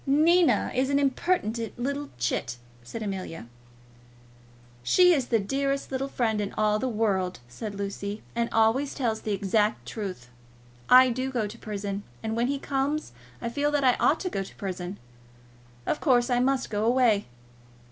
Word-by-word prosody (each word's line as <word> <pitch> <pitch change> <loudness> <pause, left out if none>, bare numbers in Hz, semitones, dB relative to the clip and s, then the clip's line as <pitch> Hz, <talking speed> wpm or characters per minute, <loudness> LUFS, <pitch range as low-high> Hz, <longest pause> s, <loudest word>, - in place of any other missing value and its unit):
"Nina 325 +5 +4
is 260 +1 +1
an 280 - +2
impertinent 255 - 0
little 280 +3 -3
chit," 120 0 -2 0.2
said 170 - -7
Amelia. 185 - -5 1.4
"She 360 - +5
is 270 -6 0
the 230 - +3
dearest 275 +7 -1
little 270 +1 -1
friend 225 -5 0
in 200 - -3
all 215 0 +2
the 260 - -1
world," 195 - 0
said 200 - -7
Lucy, 200 +1 -4
"and 235 0 0
always 225 +6 +2
tells 230 -5 -1
the 215 - -3
exact 210 +2 0
truth. 185 - -6 0.6
I 255 0 +8
do 255 +2 -2
go 240 -5 -1
to 210 +2 -7
prison, 205 -3 -4 0.2
and 220 0 -2
when 235 +1 +1
he 280 +1 0
comes 280 +2 -2 0.3
I 235 - -1
feel 285 +5 0
that 290 -1 +1
I 255 -1 +5
ought 315 - +3
to 365 - -2
go 195 - -1
to 195 - -9
prison. 185 0 -5 0.9
Of - - -1
course, 250 -4 +3
I 245 - +3
must 265 0 +1
go 210 0 0
away. 235 -3 +3
230 Hz, 165 wpm, -27 LUFS, 205-270 Hz, 1.4 s, I